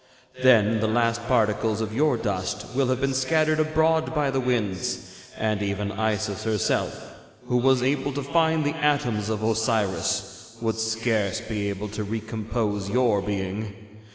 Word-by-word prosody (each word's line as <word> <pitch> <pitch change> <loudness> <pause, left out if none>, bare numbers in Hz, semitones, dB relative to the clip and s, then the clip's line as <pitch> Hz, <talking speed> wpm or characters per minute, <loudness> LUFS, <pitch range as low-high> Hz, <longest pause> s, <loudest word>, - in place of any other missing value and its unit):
'Then 115 -4 +5
the 110 - +1
last 115 +1 +1
particles 110 -2 +1
of 110 -1 -3
your 145 +1 +2
dust 105 -1 -3
will 135 0 +2
have 130 0 0
been 135 0 0
scattered 155 +4 +2
abroad 160 +1 +2
by 145 -2 +1
the 135 - 0
winds, 115 -8 -1 0.3
and 110 -2 0
even 100 0 -2
Isis 110 -1 -1
herself, 110 -2 -1 0.3
who 125 - +1
was 130 0 +3
able 140 +1 0
to 140 +1 -3
find 160 +2 +2
the 145 +2 0
atoms 140 -9 +1
of 110 -1 -2
Osiris, 110 -1 -1
would 115 -1 -1
scarce 110 -3 0
be 105 -2 -3
able 100 +1 -4
to 105 +1 -4
recompose 110 -1 -3
your 115 -3 +2
being. 100 +1 -3
110 Hz, 155 wpm, -25 LUFS, 105-130 Hz, 0.3 s, Then